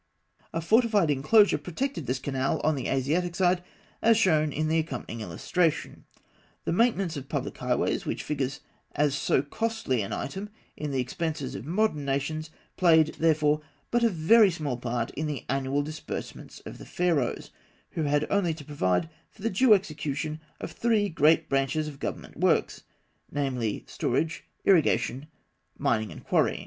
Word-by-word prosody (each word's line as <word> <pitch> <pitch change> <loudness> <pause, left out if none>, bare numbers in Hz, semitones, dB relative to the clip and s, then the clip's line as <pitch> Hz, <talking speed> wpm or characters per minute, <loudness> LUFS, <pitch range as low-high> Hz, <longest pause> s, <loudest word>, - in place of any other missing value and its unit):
A 165 - -2
fortified 210 -2 +3
enclosure 155 +6 +4
protected 180 - -4
this 130 +2 0
canal 135 0 -1
on 155 - +3
the 135 -4 -3
Asiatic 160 +7 0
side, 180 -1 +2 0.4
as 225 0 +5
shown 155 -4 +3
in 155 +3 -1
the 160 +1 +2
accompanying 130 -7 -5
illustration 160 +5 0
(fig. - - -18 0.2
42). - - -36 0.4
The - - 0
maintenance 195 -6 +2
of 135 0 -8
public 140 -2 -3
highways, 125 0 0
which - - -3
figures 135 -2 -2 0.3
as 145 -1 +2
so 135 -1 +1
costly 220 - -1
an 100 - -4
item 195 +9 -4 0.3
in 150 - -4
the 135 -2 -1
expenses 145 +2 -3
of - - -7
modern 180 -4 +1
nations, 145 +3 -2 0.3
played, 160 -3 +5
therefore, 155 -2 +3 0.3
but 240 0 +2
a 230 - +5
very 200 +5 +5
small 155 -7 -3
part 120 -1 -3
in 155 +2 -3
the 145 -4 -4
annual 135 +2 0
disbursements 155 +1 -7
of - - -9
the - - -10
Pharaohs, 165 -8 0 0.4
who 165 - -3
had 145 0 +1
only 180 -5 +2
to 150 -3 -11
provide 115 - 0 0.2
for 205 - -16
the 230 - 0
due 220 +3 +6
execution 155 -4 -3 0.2
of - - -6
three 220 -3 +1
great 160 0 +3
branches 140 +3 0
of 140 -2 -8
government - - -5
works, - - +1 0.4
namely, 130 -6 -2
storage, 160 0 -1 0.2
irrigation, 145 - +3 0.5
mining 110 -2 0
and - - -10
quarrying. - - +1
155 Hz, 160 wpm, -27 LUFS, 135-175 Hz, 0.5 s, due